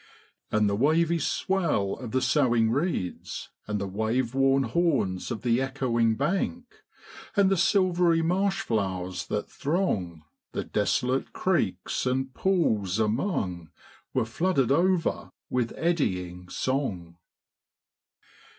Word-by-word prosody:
'And 105 -1 +3
the 100 - +1
wavy 165 +7 +2
swell 165 - 0
of 125 - -7
the 130 +3 0
soughing 120 -6 +3
reeds, 140 - -2 0.2
And 105 -1 -1
the 100 - -2
wave 110 +5 -1
worn 135 0 +3
horns 120 - 0
of 120 -3 -4
the 120 0 +2
echoing 120 -4 +1
bank, 195 - -2 0.5
And 200 -2 +4
the - - +4
silvery 175 -3 +3
marsh 190 +3 +1
flowers 95 -4 -2
that 105 - -2
throng 140 - -2 0.3
The - - -2
desolate 130 +2 0
creeks 125 - 0
and 130 +1 -1
pools 110 - +1
among, 105 - -1 0.4
Were 130 -3 +1
flooded 135 +1 +1
over 175 +3 +1 0.2
with 125 -2 0
eddying 90 - -1
song. 95 -13 -2
130 Hz, 115 wpm, -27 LUFS, 105-170 Hz, 0.5 s, And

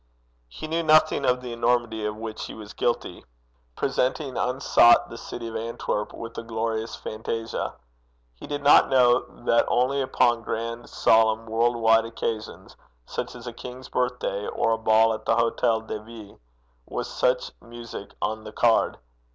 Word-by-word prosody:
He - - -8
knew 165 +2 0
nothing 155 -3 +4
of 125 0 +2
the 125 -2 -6
enormity 115 -2 0
of 105 - -4
which 110 0 -6
he - - -8
was 105 -1 -10
guilty 120 - -2 0.5
presenting 130 +1 -1
unsought 125 -2 +4
the - - -7
city 115 0 -7
of 115 - -7
Antwerp 110 -2 -3
with 115 0 -8
a - - -4
glorious 115 0 -3
phantasia. 115 +1 -4 0.6
He - - -11
did 145 -1 -4
not 145 - +6
know 125 -2 +5 0.3
that 115 - +4
only 130 +3 +1
upon 120 -3 +2
grand, 115 +1 -4
solemn, 110 0 +3
world 115 +2 +1
wide 115 -1 +4
occasions, 115 -1 -5 0.3
such - - -5
as 120 -1 -10
a 120 - -6
king's 125 +2 -9
birthday 125 -5 -2
or 115 - 0
a 115 - +2
ball 110 0 +4
at 110 - -6
the 115 - +3
Hôtel 115 -1 +1
de 110 - -4
Ville, 110 -2 -12 0.5
was - - -4
such 125 0 0
music 115 -4 -9
on 110 0 -2
the 110 - -8
card. 115 +1 +2
115 Hz, 160 wpm, -25 LUFS, 110-125 Hz, 0.6 s, not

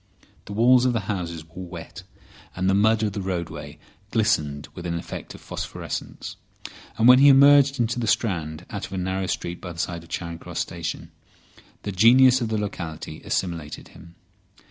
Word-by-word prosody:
The 100 - -7
walls 125 +3 +5
of 125 - +2
the 115 - 0
houses 85 -5 -4
were 85 +3 -10
wet, 85 +1 -9 0.6
the 95 +1 +2
mud 110 +2 +3
of 105 -2 -1
the 100 - -3
roadway 90 -3 -5 0.3
glistened 80 -11 0
with 90 -1 -7
an 85 0 -2
effect - - -7
of - - -13
phosphorescence, - - -6 0.6
and 115 +1 +4
when 125 +1 +9
he 140 - +7
emerged 140 0 +6
into 120 +1 0
the 115 - -2
Strand 85 -8 -1
out 100 -3 -4
of 95 - -12
a - - -3
narrow 95 +1 -2
street 85 -1 -4
by 90 - -6
the - - -14
side 85 0 -3
of 85 - -17
Charing 85 -1 -5
Cross - - -9
Station 85 -2 -4 0.7
the 100 - -3
genius 125 +6 +6
of 115 - 0
the 110 - 0
locality 80 -6 -5
assimilated 80 -5 -3
him. 85 0 -15
95 Hz, 180 wpm, -24 LUFS, 85-115 Hz, 0.7 s, when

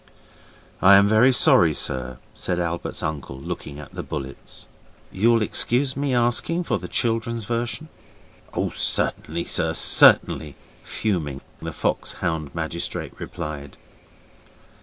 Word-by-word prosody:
'I 100 +1 +8
am 100 +1 +6
very 110 +5 +5
sorry, 85 -9 +5
sir' 65 -1 -1 0.2
said 90 - -2
Albert's 85 0 -3
uncle, 70 -4 -4
looking 70 +1 -6
at 75 - -11
the - - -5
bullets. 70 0 -8 0.5
'You'll 115 +3 +3
excuse 130 +5 +1
my 140 0 -1
asking 120 +8 +1
for - - -1
the - - -7
children's 115 -1 -1
version?' 120 +6 -2 0.7
'Oh, - - -1
certainly, 85 +2 -2
sir, 80 0 0
certainly,' 75 -2 +4 0.3
fuming, 80 -10 -2 0.2
the - - -5
fox - - -2
hound 80 -4 -3
magistrate - - -4
replied. 75 -5 -7
90 Hz, 120 wpm, -23 LUFS, 75-115 Hz, 0.7 s, I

